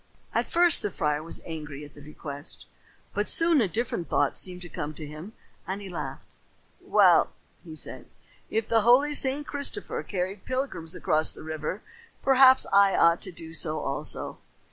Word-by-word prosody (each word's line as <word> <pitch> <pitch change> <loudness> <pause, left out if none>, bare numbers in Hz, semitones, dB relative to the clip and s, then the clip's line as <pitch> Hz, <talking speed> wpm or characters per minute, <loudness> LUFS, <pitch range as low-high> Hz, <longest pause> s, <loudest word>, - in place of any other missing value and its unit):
At - - 0
first 345 -2 +5
the 210 - -1
friar 150 -4 -1
was 165 - -5
angry 150 -3 -7
at 145 - -15
the 145 - -14
request, 145 -1 -9 0.5
but 205 +1 -1
soon 330 -4 +4
a 215 - +2
different 185 - -2
thought 145 - +1
seemed 180 -1 -2
to - - -8
come 150 -2 -5
to 155 - -5
him 155 +8 -9 0.3
and 190 +2 -3
he 200 -2 -8
laughed. 135 -6 -7 0.5
"Well," - - +4 0.3
he 160 -2 -10
said, - - -6 0.4
"if 220 0 -1
the 225 -1 +3
holy 255 +7 +4
St. 280 +1 +1
Christopher 285 +9 0
carried 190 0 -4
pilgrims 255 -11 -2
across 155 -2 +3
the - - -10
river, 155 +5 -5 0.4
perhaps 265 -1 +6
I 200 -1 +5
ought 170 +1 +4
to 190 - -6
do 165 -1 -8
so 155 -2 0
also. - - -4
180 Hz, 170 wpm, -27 LUFS, 155-240 Hz, 0.5 s, perhaps